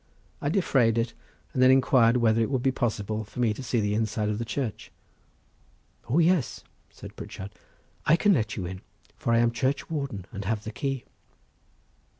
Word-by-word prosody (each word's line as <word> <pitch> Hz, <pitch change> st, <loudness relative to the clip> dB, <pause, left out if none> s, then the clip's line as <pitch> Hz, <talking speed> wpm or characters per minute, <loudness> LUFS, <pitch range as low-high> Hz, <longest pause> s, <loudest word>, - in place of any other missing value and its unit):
I 145 Hz, -, 0 dB
defrayed 135 Hz, -, +2 dB
it, 115 Hz, 0 st, 0 dB, 0.4 s
and 130 Hz, -, 0 dB
then 130 Hz, -, +7 dB
inquired 125 Hz, -2 st, +5 dB
whether 115 Hz, -1 st, +3 dB
it 110 Hz, -, +1 dB
would 130 Hz, -3 st, -1 dB
be 135 Hz, -, +3 dB
possible 110 Hz, -4 st, -2 dB
for 110 Hz, -, -11 dB
me 115 Hz, -3 st, +2 dB
to 120 Hz, -, -8 dB
see 120 Hz, -2 st, 0 dB
the 105 Hz, -1 st, 0 dB
inside 110 Hz, -1 st, 0 dB
of 105 Hz, 0 st, -2 dB
the 115 Hz, -, -2 dB
church. 115 Hz, -2 st, -4 dB, 1.2 s
"O 135 Hz, -, +2 dB
yes," 170 Hz, -5 st, +2 dB, 0.3 s
said -, -, -12 dB
Pritchard. 95 Hz, +2 st, -8 dB, 0.6 s
"I 155 Hz, -, +7 dB
can 205 Hz, +3 st, +4 dB
let 110 Hz, -, 0 dB
you 95 Hz, -, -3 dB
in, 95 Hz, +1 st, -6 dB, 0.3 s
for 115 Hz, -, -2 dB
I 115 Hz, -, +4 dB
am 120 Hz, 0 st, +3 dB
churchwarden 135 Hz, -, -2 dB
and 100 Hz, -2 st, -5 dB
have 110 Hz, +1 st, -1 dB
the 110 Hz, -, -5 dB
key." 135 Hz, -1 st, -3 dB
115 Hz, 180 wpm, -27 LUFS, 110-135 Hz, 1.2 s, then